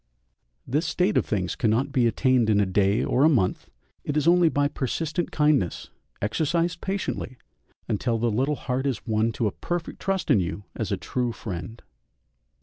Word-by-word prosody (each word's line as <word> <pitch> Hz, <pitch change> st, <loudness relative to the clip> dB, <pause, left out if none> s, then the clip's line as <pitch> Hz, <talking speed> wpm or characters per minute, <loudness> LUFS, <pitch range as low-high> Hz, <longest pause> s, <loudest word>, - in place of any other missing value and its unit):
This 150 Hz, +6 st, 0 dB
state 185 Hz, +3 st, +1 dB
of -, -, +2 dB
things 95 Hz, -4 st, -1 dB
cannot 120 Hz, +2 st, +1 dB
be 125 Hz, -4 st, +3 dB
attained 125 Hz, -1 st, +2 dB
in 105 Hz, -1 st, +4 dB
a 100 Hz, -, +3 dB
day 100 Hz, +2 st, +2 dB
or 130 Hz, -, +2 dB
a 155 Hz, -, +7 dB
month; 115 Hz, -12 st, 0 dB, 0.3 s
it 145 Hz, -, -2 dB
is 150 Hz, -, +1 dB
only 175 Hz, -1 st, +5 dB
by 145 Hz, -1 st, +1 dB
persistent 155 Hz, +5 st, -2 dB
kindness, 150 Hz, -, +1 dB, 0.3 s
exercised 165 Hz, +9 st, 0 dB
patiently, 190 Hz, -, -3 dB, 0.5 s
until 115 Hz, +2 st, 0 dB
the 115 Hz, +1 st, 0 dB
little 135 Hz, +7 st, +1 dB
heart 130 Hz, 0 st, -2 dB
is 125 Hz, -6 st, -3 dB
won 110 Hz, 0 st, +1 dB
to 115 Hz, -, -1 dB
a 105 Hz, -, +1 dB
perfect 175 Hz, -, -4 dB
trust 195 Hz, -1 st, -1 dB
in -, -, +5 dB
you 90 Hz, +3 st, -3 dB
as -, -, -3 dB
a -, -, 0 dB
true 125 Hz, -2 st, -2 dB
friend. 105 Hz, +1 st, -7 dB
130 Hz, 175 wpm, -25 LUFS, 110-155 Hz, 0.5 s, a